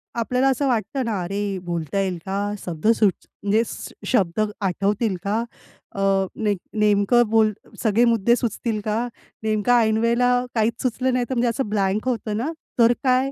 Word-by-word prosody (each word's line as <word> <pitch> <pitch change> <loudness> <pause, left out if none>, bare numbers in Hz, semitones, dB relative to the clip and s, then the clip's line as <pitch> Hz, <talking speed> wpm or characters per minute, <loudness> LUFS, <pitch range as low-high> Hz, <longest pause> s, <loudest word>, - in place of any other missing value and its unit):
आपल्याला 250 +3 +1
असं 275 +1 +1
वाटतं 255 +2 -1
ना, 220 -4 -1
"अरे 195 +4 -3 0.3
बोलता 170 +1 -2
येईल 190 -2 -1
का? 195 0 -2 0.3
शब्द 165 +2 -3
सुच 220 -4 +4 0.3
म्हणजे 205 +2 +3 0.5
शब्द 190 -5 +1 0.2
आठवतील 200 +2 0
का? 215 +3 0 0.5
अ, 195 - -3 0.4
नेम 205 -2 +1 0.2
नेमकं 210 +3 +4
बोल 220 -1 +4 0.3
सगळे 225 +1 +4
मुद्दे 230 +2 +3
सुचतील 230 -2 -2
का? 215 0 0 0.5
नेमकं 215 +1 +1
ऐनवेळेला 230 +2 +2 0.3
काहीच 225 +1 0
सुचलं 255 +1 0
नाही 250 -1 +1
तर" - - -1
म्हणजे 240 0 +2
असं 230 -1 -2
ब्लँक 205 +2 0
होतं 220 -3 -2
ना 260 +8 -2 0.3
"तर 235 +1 +6
काय?" 260 +1 +2
220 Hz, 160 wpm, -23 LUFS, 200-240 Hz, 0.5 s, तर